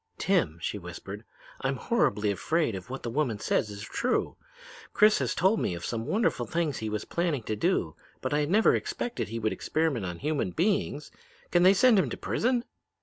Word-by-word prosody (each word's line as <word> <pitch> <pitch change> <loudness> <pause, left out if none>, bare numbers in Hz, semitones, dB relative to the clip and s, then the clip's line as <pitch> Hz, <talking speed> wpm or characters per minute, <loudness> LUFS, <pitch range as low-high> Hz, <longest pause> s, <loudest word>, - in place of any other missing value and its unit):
"'Tim,' - - +1
she - - -3
whispered, - - -8 0.4
'I'm - - 0
horribly 105 - +1
afraid 155 - 0
that 95 +4 -7
what 135 +1 -6
the 120 - -3
woman 130 -5 0
says 105 - 0
is 100 0 -7
true. 245 - -1 0.6
Chris 210 0 +5
has - - -1
told 190 +6 +3
me 90 - -1
of 85 - -6
some 115 -1 -3
wonderful 200 - +1
things 165 -6 -1
he 110 - -3
was 105 0 -3
planning 170 -8 -1
to 110 - -2
do, 105 - 0 0.2
but - - -3
I 150 0 +2
never 205 +8 +4
expected 240 0 -2
he 115 +2 -5
would 110 -3 0
experiment 140 - -1
on 90 -1 -5
human 145 - -1
beings. 175 -5 0 0.4
Can 175 - +4
they 185 +2 +7
send 240 -1 +6
him - - +1
to - - -5
prison?' 245 0 0
150 Hz, 195 wpm, -28 LUFS, -, 0.6 s, they